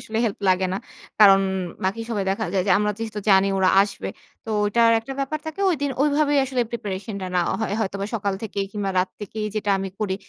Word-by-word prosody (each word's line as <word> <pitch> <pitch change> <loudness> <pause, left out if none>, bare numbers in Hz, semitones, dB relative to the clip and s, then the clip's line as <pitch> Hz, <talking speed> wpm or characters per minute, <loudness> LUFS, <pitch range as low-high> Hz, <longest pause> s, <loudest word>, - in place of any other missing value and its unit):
আসলে, 220 0 -4
হেল্প 215 -4 -2
লাগে 185 0 +3
না। 190 - -1 0.4
কারণ, 195 -2 +8 0.4
বাকি 195 +4 -1
সবাই 205 -4 -1
দেখা 195 - -1
যায় 190 -2 +2
যে, - - +1
আমরা 210 0 +1
যেহেতু 220 -2 -4
জানি 195 0 +5
ওরা 185 -1 +4
আসবে। 200 -1 -4 0.4
তো 225 - -6
ঐটা 220 +3 +2 0.2
একটা 230 +4 -7
ব্যাপার 275 +3 -2
থাকে। 315 +4 -6
ঐদিন 285 -4 -1
ঐভাবেই 290 0 +2
আসলে 260 -1 -1
প্রিপারেশন 210 -2 -5
টা 185 - -4
নেওয়া 175 -1 +1
হয়। 220 -2 -1
হয়তোবা 200 -1 -2
সকাল 205 -3 -1
থেকেই, 200 -2 -2
কিংবা 205 -2 -2
রাত 185 +1 +2
থেকেই 210 +1 -4
যেটা 210 -1 -1
আমি 195 - -3
করি, 200 -3 0
210 Hz, 210 wpm, -23 LUFS, 195-230 Hz, 0.4 s, কারণ